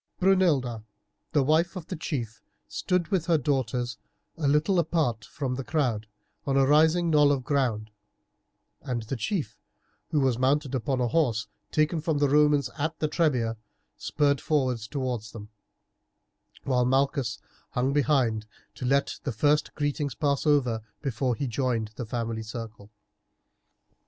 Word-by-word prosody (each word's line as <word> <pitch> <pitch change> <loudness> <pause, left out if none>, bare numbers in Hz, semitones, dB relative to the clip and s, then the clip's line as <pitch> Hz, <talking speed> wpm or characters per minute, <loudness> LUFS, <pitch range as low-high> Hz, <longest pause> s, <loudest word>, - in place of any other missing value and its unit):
Brunilda, 160 - +2 0.5
the 145 - +3
wife 160 +6 +2
of 180 -4 -6
the 185 - -5
chief, 120 -8 -4 0.3
stood 180 -2 -1
with 185 -5 0
her 170 -2 +4
daughters 125 -4 -1 0.4
a 155 -4 -1
little 155 +6 +3
apart 155 -9 0
from 135 -3 -4
the 135 +1 -4
crowd 125 -8 -1 0.4
on 135 0 +2
a 135 - +5
rising 160 +4 +4
knoll 150 -2 +5
of 135 -3 0
ground, 120 -6 0 0.9
and 120 -3 -3
the 115 +5 -4
chief, 155 - -3 0.5
who 150 - +1
was 130 -3 +1
mounted 140 +1 +1
upon 130 +1 -1
a 120 - +2
horse 120 -7 +1 0.2
taken 155 +1 +1
from 160 -1 0
the 145 0 +3
Romans 145 -1 +4
at 155 +2 -1
the 155 - 0
Trebia, 130 -8 +1 0.4
spurred 140 -2 +1
forward 130 -6 +1
towards 120 -2 -4
them, 105 -2 -9 1.1
while 125 -2 +2
Malchus 130 -2 +1 0.3
hung 130 +2 0
behind 130 -7 +1 0.3
to 125 - -6
let 140 +2 +1
the 140 - -2
first 145 +6 +2
greeting 145 -1 -1
pass 145 -1 +1
over 125 -7 +2 0.2
before 130 -2 0
he 140 - -3
joined 120 -3 -1
the 120 - -5
family 115 -1 -3
circle. 110 -2 -8
135 Hz, 145 wpm, -27 LUFS, 120-150 Hz, 1.1 s, a